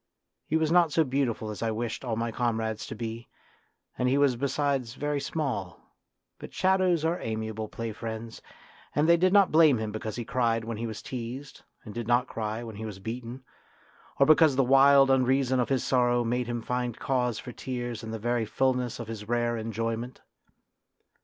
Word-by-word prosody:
He 160 - +2
was 160 -1 +1
not 170 -2 +4
so 160 - +3
beautiful 130 -6 -1
as 105 - -8
I 115 - 0
wished 115 +2 -3
all 120 -3 -2
my 115 +1 -2
comrades 110 -2 -2
to - - -6
be, 115 0 -6 0.7
and 125 - +2
he 135 - +2
was 140 -3 +3
besides 135 -2 -1
very 145 0 -1
small; 135 - -3 0.6
but - - -9
shadows 185 -3 +2
are 170 +2 0
amiable 110 -1 -3
play 115 +1 -5
friends, 110 +1 -7 0.5
and 150 +2 +3
they 170 - +7
did 185 +2 +3
not 200 -1 +5
blame 155 -5 +6
him 110 -1 -3
because 110 0 -5
he 120 - -4
cried 115 -2 0
when 115 -1 -4
he 115 +1 -3
was 110 -1 -7
teased 130 +3 -7 0.2
and 105 - -8
did 120 0 -5
not 120 +1 +3
cry 110 +1 -4
when 110 -3 -8
he 110 - -6
was 105 -3 -7
beaten, 120 +5 -6 0.7
or 140 - +5
because 155 -1 +5
the 135 - +3
wild 135 +1 +6
unreason 130 0 +2
of 125 - 0
his 135 -3 +1
sorrow 120 -1 +2
made 120 +1 -1
him 120 -1 -3
find 125 -1 -2
cause 125 -4 0
for 125 - -7
tears 120 -2 -5
in 110 - -7
the 110 - -4
very 120 +1 0
fullness 125 +2 0
of 115 - -6
his 110 -1 -7
rare 120 0 +1
enjoyment. 115 +2 -3
120 Hz, 190 wpm, -28 LUFS, 115-135 Hz, 0.7 s, they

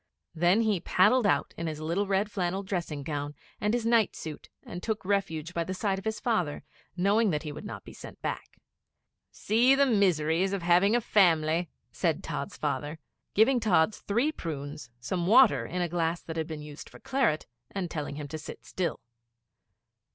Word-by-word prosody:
Then 175 +6 +3
he 215 -4 +1
paddled 210 +7 +3
out - - +1
in 165 - -3
his 155 -1 -4
little 170 +6 -1
red 200 +2 0
flannel 190 0 -1
dressing 170 -7 -3
gown 145 0 -4 0.2
and 210 - +1
his 235 -1 -1
night 230 -2 +3
suit, 155 -2 -8
and 175 - -7
took 215 -2 -3
refuge 180 -5 -1
by 170 - 0
the 185 +3 -4
side 195 0 -1
of 195 - -13
his 220 -1 -2
father, 180 -12 -1 0.3
knowing 205 +4 +3
that 150 -3 -1
he 150 - -5
would 150 +6 -8
not - - -7
be - - -11
sent - - -11
back. - - -5 0.7
'See 240 +5 +3
the 280 +1 +4
miseries 190 - +2
of 195 -3 -2
having 180 +5 +4
a 240 - +2
family!' 170 -5 +3 0.2
said - - -1
Tods' - - -5
father, 150 +2 -2 0.4
giving 245 +5 +5
Tods 205 -4 +2
three 235 +9 0
prunes, 145 - -6
some 170 +8 -2
water 235 +3 +6
in 180 0 -2
a - - 0
glass 170 0 -1
that 160 - -6
had 160 -1 -2
been 155 -2 -6
used 150 0 -10
for - - -14
claret, 260 - 0 0.2
and 185 -4 -4
telling 145 -2 -4
him 145 0 -6
to 155 - -5
sit 150 - -10
still. 180 -2 -3
180 Hz, 190 wpm, -28 LUFS, 160-210 Hz, 0.7 s, water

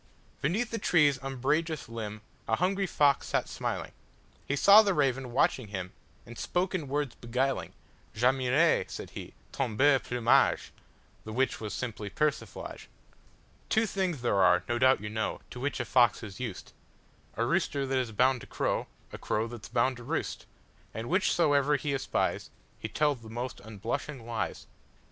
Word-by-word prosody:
Beneath 205 - 0
the 230 - -2
tree's 150 -8 +3
umbrageous 140 +4 -1
limbA 110 -2 -6 0.3
hungry 190 - +1
fox 145 -4 +3
sat - - 0
smiling; - - -4 0.6
He 140 - 0
saw 200 +8 +8
the 200 -4 +1
raven 135 -4 0
watching 125 -1 +2
him, 95 -3 -5 0.3
And 120 0 -10
spoke 180 +2 -1
in 165 -6 -2
words 145 -1 -1
beguiling:"J' 125 -2 -3
admire," 130 +5 +3
said - - -7
he, - - -9 0.2
"ton 125 -5 -2
beau 140 +1 +5
plumage,"(The 120 -2 0
which 130 +1 0
was 105 -2 -4
simply 110 -4 -4
persiflage).Two 150 - -4
things 185 - -2
there 100 -5 +2
are, 90 -1 +5
no 120 0 0
doubt 130 -3 +4
you 105 - -5
know, 110 0 -2
To 125 - -7
which 145 +3 -2
a - - -1
fox 120 -2 +3
is 100 -3 -8
used,—A 110 -6 -7
rooster 140 -1 0
that 135 0 0
is 125 -3 -2
bound 125 +3 +2
to - - -11
crow,A - - -4
crow 110 +2 -1
that 115 -3 -9
's - - -20
bound 125 +2 +1
to 120 - -10
roost, - - -3 0.5
And 115 +1 -4
whichsoever 150 -5 +3
he 145 0 -2
espiesHe 135 - -1 0.5
tells 145 -5 +2
the 110 - -11
most 120 +3 -5
unblushing 115 +5 -5
lies. 115 -1 -3
130 Hz, 155 wpm, -29 LUFS, 115-150 Hz, 0.6 s, saw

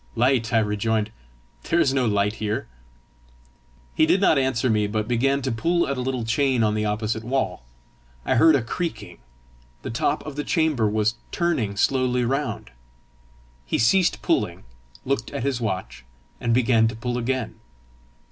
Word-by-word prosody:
"Light!" 120 -1 +2
I 115 - +3
rejoined; 110 0 0 0.6
"there 170 - +3
is 140 -6 +3
no 130 -3 +1
light 105 +1 0
here!" 105 0 -2 1.3
He 155 - +3
did 195 - +3
not 160 -7 +4
answer 130 -2 0
me, 105 -3 +2
but 105 +1 -2
began 135 +3 +1
to 130 - -1
pull 170 +10 +1
at 140 - -1
a 125 - -3
little 125 -2 -2
chain 125 +1 +1
on 105 -1 +2
the 105 0 -1
opposite 110 +1 -2
wall. 120 - -1 0.6
I - - +1
heard 160 +5 +6
a 130 - +1
creaking: 110 - -5 0.6
the - - -4
top 145 +6 -1
of 150 -2 -7
the 145 - -1
chamber 150 -11 +1
was 110 +2 0
turning 125 - -1
slowly 125 +1 +1
round. 135 +4 -2 0.9
He - - -1
ceased 180 +11 +2
pulling, - - 0 0.4
looked 130 -3 -1
at 140 - -3
his 135 -3 -1
watch, 95 - -4 0.4
and 115 - -1
began 115 -2 +3
to 110 - -4
pull 120 +2 -3
again. 130 0 -3
120 Hz, 165 wpm, -23 LUFS, 110-135 Hz, 1.3 s, heard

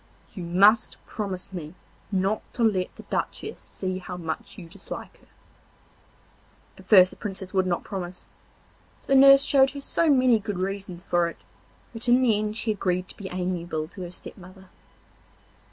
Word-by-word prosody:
You 190 - -7
must 195 +6 +4
promise 195 -3 -5
me 165 -2 -7 0.4
not 195 +2 0
to 240 - 0
let 190 -5 +1
the - - -11
Duchess - - -4
see 185 -1 -5
how 180 -1 -7
much 165 -2 -5
you 175 - -9
dislike 190 +3 -8
her.' - - -25 1.5
At - - -15
first 185 -4 +7
the - - -12
Princess 190 -3 -6
would 190 -1 +2
not 175 -1 -1
promise, 185 -3 -6 0.7
but - - -24
the - - +4
nurse 275 0 +8
showed 270 -1 +4
her - - -6
so 325 +3 +1
many 255 -5 +5
good 205 -2 -4
reasons 190 -1 -4
for 175 -2 +2
it 170 - -7 0.6
that 230 +1 -3
in 250 +2 +5
the 230 -4 +4
end 210 +1 -2
she 230 - -1
agreed 185 -3 -1
to - - -11
be 200 - -7
amiable 175 -3 -3
to 190 - -10
her 175 - -5
step 180 - -9
mother. 185 0 -14
190 Hz, 175 wpm, -25 LUFS, 180-215 Hz, 1.5 s, nurse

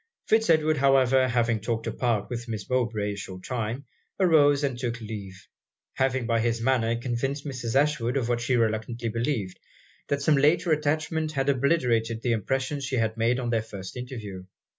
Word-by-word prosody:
Fitz 220 -2 +2
Edward, 155 -1 +3
however, 135 -1 +4
having 115 -2 +1
talked 115 +1 -3
apart 115 -2 -1
with 120 0 -5
Miss 110 -3 -5
Mowbray 115 -5 0
a - - -6
short 95 -2 -8
time, 120 +2 -3 0.3
arose 150 -6 +4
and 135 -3 0
took 120 -2 -3
leave, 105 -3 -8 0.5
having 130 -2 0
by 115 -1 +1
his 115 0 0
manner 115 -1 +1
convinced 130 +4 -3
Mrs. 125 -5 -4
Ashwood 140 -4 +1
of 125 -4 -1
what 120 0 0
she 125 +2 +1
reluctantly 115 +1 -1
believed, 115 -5 -2 0.5
that 140 0 -1
some 150 0 +4
later 155 +4 +3
attachment 155 +1 0
had 135 -1 0
obliterated 125 -5 +1
the 120 - +1
impression 130 +6 -1
she 135 0 -2
had 110 -2 0
made 115 +2 +1
at 120 -2 -2
their 115 -2 +2
first 100 -4 -9
interview. 110 -7 -7
120 Hz, 175 wpm, -26 LUFS, 115-140 Hz, 0.5 s, however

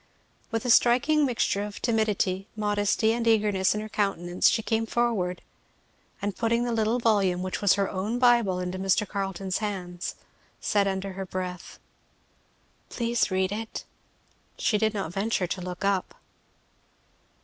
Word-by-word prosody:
With 225 +1 -2
a 245 - +3
striking 275 +6 +4
mixture 225 -4 0
of 205 0 -6
timidity, 210 -4 0
modesty, 210 +1 +1
and 235 0 -2
eagerness 210 -3 +3
in 210 - -2
her 215 - -6
countenance 185 -4 +1
she 225 - 0
came 225 0 0
forward, 215 -7 0 0.8
and 200 -2 -1
putting 235 +1 +1
the 240 - -1
little 225 +1 +1
volume, 200 -6 +2
which 185 - -3
was 205 -2 +5
her 200 -1 +1
own 200 +6 -2
Bible, 240 -7 +4
into 180 +1 -4
Mr. 195 +2 +1
Carleton's 195 -1 -3
hands 185 -4 -4 0.4
said 200 -1 +1
under 190 0 -3
her 190 0 -5
breath, 180 -1 -5 1.1
"Please 235 0 0
read 190 0 0
it." 220 +2 -5 0.7
She 210 - +1
did 220 0 +1
not 190 -5 -3
venture 195 -1 0
to 180 +1 -4
look 180 +2 -5
up. 195 -2 0
205 Hz, 150 wpm, -27 LUFS, 190-225 Hz, 1.1 s, was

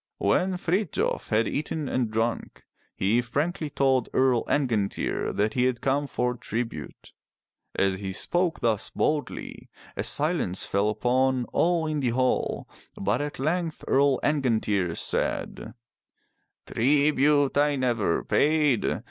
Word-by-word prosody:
When 180 - +1
Frithjof 180 +1 -1
had 110 +1 +2
eaten 150 0 -3
and 125 -4 -1
drunk, 115 +2 -2 0.3
he 110 +6 +2
frankly 150 +6 -2
told 135 -3 +1
Earl 130 -2 +3
Angantyr 115 -8 0
that 105 +1 0
he 125 -1 +2
had 130 -2 0
come 140 +3 0
for 125 -2 -1
tribute. 115 - -6 0.6
As 95 -1 +1
he 95 -1 -4
spoke 175 - 0
thus 110 -3 +1
boldly, 150 -3 -3 0.3
a - - -2
silence 150 - 0
fell 100 +2 +1
upon 125 +3 +1
all 170 -1 +2
in 155 -1 -1
the 130 -3 0
hall, 130 +2 0 0.3
but 100 +7 0
at 145 0 -4
length 160 +3 -2
Earl 140 -1 +3
Angantyr 110 - 0
said: - - -2 0.4
'* - - -48
Tribute 145 +2 +2
I 145 0 +3
never 120 -9 0
paid. 150 -5 +2
130 Hz, 130 wpm, -26 LUFS, 115-150 Hz, 0.6 s, Earl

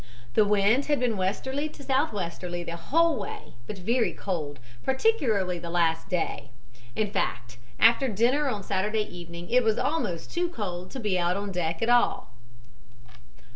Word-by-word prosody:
The 215 - +5
wind 210 +6 +3
had 290 -1 +2
been 245 -3 +1
westerly 265 +10 -1
to 290 - -13
southwesterly 190 - -1
the 170 0 -5
whole 320 - +2
way, - - -7
but 205 - -5
very 230 +6 +1
cold, 155 -7 -4 0.3
particularly 240 - +1
the 170 - -6
last 165 -1 +1
day; 180 -3 -2 0.5
in 210 -2 0
fact 120 - -2 0.2
after 235 +4 +6
dinner 250 +7 +2
on 210 -5 -3
Saturday 210 +3 0
evening 175 -2 -9
it 250 +1 +5
was 220 -1 +2
almost 250 - -1
too 350 0 0
cold 185 - -5
to 270 - -6
be 205 -6 0
out 175 +2 +1
on 200 0 -3
deck 170 0 -1
at 230 - +1
all. 240 0 +3
205 Hz, 160 wpm, -27 LUFS, 175-255 Hz, 0.5 s, after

